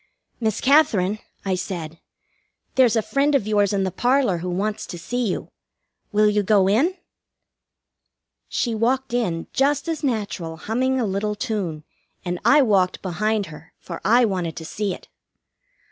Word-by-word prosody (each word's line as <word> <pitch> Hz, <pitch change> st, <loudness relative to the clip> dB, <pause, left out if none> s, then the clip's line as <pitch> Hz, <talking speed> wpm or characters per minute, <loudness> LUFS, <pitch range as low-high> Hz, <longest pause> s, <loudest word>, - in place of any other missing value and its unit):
"Miss 220 Hz, -3 st, 0 dB
Katherine," 215 Hz, -9 st, +3 dB, 0.3 s
I 190 Hz, -, +1 dB
said, 170 Hz, -3 st, -5 dB, 0.7 s
"there's 250 Hz, -3 st, +4 dB
a 225 Hz, -, +2 dB
friend 280 Hz, +4 st, +1 dB
of 265 Hz, -, +2 dB
yours 205 Hz, -2 st, +2 dB
in 200 Hz, -1 st, +1 dB
the 190 Hz, -, -1 dB
parlor 245 Hz, -5 st, +2 dB
who 180 Hz, +2 st, -4 dB
wants 205 Hz, +4 st, -2 dB
to 175 Hz, -, -7 dB
see 240 Hz, +8 st, -2 dB
you. 185 Hz, -, -3 dB, 0.6 s
Will 210 Hz, 0 st, +4 dB
you 210 Hz, 0 st, +2 dB
go 200 Hz, -1 st, +3 dB
in?" 285 Hz, -, +2 dB, 1.5 s
She 235 Hz, -, -1 dB
walked 250 Hz, +3 st, 0 dB
in, 180 Hz, -9 st, -1 dB
just 280 Hz, +3 st, +1 dB
as 320 Hz, -2 st, -3 dB
natural, 205 Hz, -, -2 dB
humming 255 Hz, +9 st, 0 dB
a 240 Hz, -, +1 dB
little 205 Hz, +1 st, -1 dB
tune, 185 Hz, -9 st, -3 dB, 0.4 s
and 175 Hz, 0 st, -2 dB
I 280 Hz, +6 st, +6 dB
walked 195 Hz, -6 st, +2 dB
behind 210 Hz, +3 st, 0 dB
her, 150 Hz, +1 st, -14 dB
for 170 Hz, -, -8 dB
I 240 Hz, +2 st, +5 dB
wanted 180 Hz, -6 st, -2 dB
to 160 Hz, -, -7 dB
see 205 Hz, +4 st, -2 dB
it. -, -, -8 dB
210 Hz, 160 wpm, -23 LUFS, 185-245 Hz, 1.5 s, I